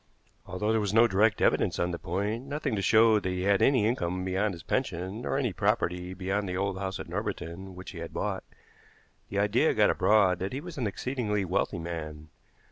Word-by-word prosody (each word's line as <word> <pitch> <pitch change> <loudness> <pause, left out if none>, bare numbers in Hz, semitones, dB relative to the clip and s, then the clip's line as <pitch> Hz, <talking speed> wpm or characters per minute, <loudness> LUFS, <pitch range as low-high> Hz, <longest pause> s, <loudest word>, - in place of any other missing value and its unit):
Although 105 +4 -1
there 110 -1 +2
was 105 0 -1
no 115 +1 +7
direct 110 0 +2
evidence - - +2
on 90 0 0
the 85 - -4
point, 105 +8 -3
nothing 145 -4 -2
to 100 - -1
show 110 +1 +5
that 95 - -3
he 90 0 -2
had 100 0 +3
any 130 -6 +4
income 90 -5 -1
beyond 95 +1 0
his 80 - -12
pension, 95 -4 -2
nor 135 - -1
any 125 -8 0
property 90 -3 0
beyond 95 +2 -2
the 90 - -2
old 100 -1 -1
house 95 0 -3
at - - -6
Norbiton 95 +3 -5
which 90 +1 -8
he 85 - -8
had 85 0 -6
bought, - - -3 0.9
the 100 - -4
idea 100 0 +2
got - - +4
abroad 100 -4 +3
that 95 +4 -3
he 135 - -2
was 170 -1 -8
an 120 - 0
exceedingly 105 -2 -2
wealthy 90 0 0
man. 80 -2 -6
100 Hz, 210 wpm, -28 LUFS, 90-110 Hz, 0.9 s, no